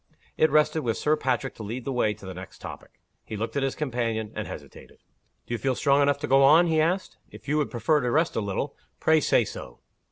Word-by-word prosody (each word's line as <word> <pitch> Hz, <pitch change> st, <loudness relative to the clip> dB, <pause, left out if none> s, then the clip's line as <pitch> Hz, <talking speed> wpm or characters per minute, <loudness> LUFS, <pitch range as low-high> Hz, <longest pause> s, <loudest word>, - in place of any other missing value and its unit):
It 155 Hz, -, +3 dB
rested 150 Hz, +1 st, +3 dB
with 115 Hz, -5 st, -1 dB
Sir 150 Hz, +1 st, +2 dB
Patrick 130 Hz, -6 st, -1 dB
to -, -, -11 dB
lead 115 Hz, +4 st, -5 dB
the 135 Hz, -, -2 dB
way 110 Hz, -4 st, +1 dB
to 100 Hz, -, -14 dB
the 95 Hz, -, -6 dB
next 95 Hz, +1 st, -10 dB
topic. -, -, -10 dB, 0.2 s
He 110 Hz, -, -7 dB
looked 115 Hz, +2 st, -4 dB
at 140 Hz, -, +1 dB
his 135 Hz, -1 st, -1 dB
companion, 115 Hz, -6 st, -2 dB
and -, -, -4 dB
hesitated. -, -, -11 dB, 0.5 s
"Do -, -, -5 dB
you 120 Hz, -, -2 dB
feel 135 Hz, -1 st, 0 dB
strong 140 Hz, +1 st, +3 dB
enough 140 Hz, 0 st, +3 dB
to 150 Hz, -, -2 dB
go 135 Hz, 0 st, +5 dB
on?" 155 Hz, +6 st, +7 dB
he 160 Hz, -2 st, +2 dB
asked. 180 Hz, +4 st, -1 dB
"If -, -, -14 dB
you 150 Hz, +2 st, +1 dB
would 150 Hz, -, 0 dB
prefer 140 Hz, +6 st, +1 dB
to 125 Hz, -, -1 dB
rest 160 Hz, +6 st, +1 dB
a -, -, 0 dB
little, 100 Hz, -2 st, -3 dB, 0.2 s
pray 160 Hz, 0 st, +4 dB
say -, -, +3 dB
so." -, -, -9 dB
135 Hz, 245 wpm, -26 LUFS, 115-150 Hz, 0.5 s, on